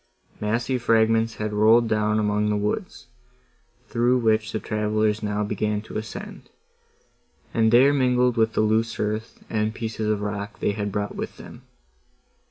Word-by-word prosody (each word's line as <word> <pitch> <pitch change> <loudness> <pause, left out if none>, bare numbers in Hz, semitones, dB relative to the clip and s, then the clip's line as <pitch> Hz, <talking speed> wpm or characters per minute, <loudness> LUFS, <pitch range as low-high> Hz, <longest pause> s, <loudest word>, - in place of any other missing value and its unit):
Massy 115 +4 -1
fragments 115 -1 +2
had 105 0 -3
rolled 110 +3 +5
down 105 -1 +1
among 105 0 +1
the 105 - +1
woods, 105 +1 -3 0.8
through 120 +2 +2
which 110 -2 +1
the 110 - -2
travellers 105 0 0
now 105 0 -1
began 105 0 -1
to - - -11
ascend, 110 0 -7 1.0
and 110 -1 +3
there 130 +4 +6
mingled 125 -2 +2
with 110 -1 +2
the - - +1
loose 110 +1 +1
earth, 110 +2 -3
and 110 0 -1
pieces 110 -1 -3
of 105 -1 0
rock 105 0 -5
they - - +1
had 105 0 -3
brought 105 0 -3
with - - -6
them. - - -12
110 Hz, 155 wpm, -24 LUFS, 105-115 Hz, 1.0 s, there